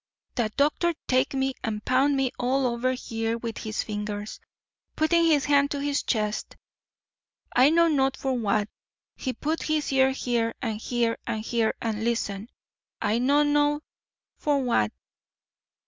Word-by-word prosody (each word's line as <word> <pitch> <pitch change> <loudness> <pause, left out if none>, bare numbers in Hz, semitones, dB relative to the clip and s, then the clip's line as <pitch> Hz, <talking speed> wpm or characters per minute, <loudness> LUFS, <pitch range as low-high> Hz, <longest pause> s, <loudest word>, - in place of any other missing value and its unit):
That 220 -4 -2
doctor 305 +4 +2
take 255 +2 +2
me 265 0 0
and 215 -2 -3
pound 275 +2 +3
me 265 -2 +1
all 260 +2 +1
over 245 +1 0
here 225 -2 -3
with 230 -1 -5
his 215 -1 -3
fingers"—putting 215 +10 -3
his 295 -5 +3
hand 285 -1 +4
to 285 - -3
his 285 0 0
chest—"I 220 +3 -2
not 335 +1 +4
know 270 -2 +3
for 265 -1 -1
what. 210 -3 +1 0.5
He 260 - -3
put 310 +5 -2
his 305 -2 -1
ear 265 0 +5
here 240 -3 -1
and 225 -5 -2
here 235 -2 0
and 215 - -2
here, 230 -2 +1
and 220 -1 -2
listen— 225 -2 -2 0.5
I 215 +3 +1
not 285 +4 +3
know 290 0 +2 0.6
for 285 -3 +1
what. 110 - +2
255 Hz, 145 wpm, -26 LUFS, 225-285 Hz, 0.6 s, ear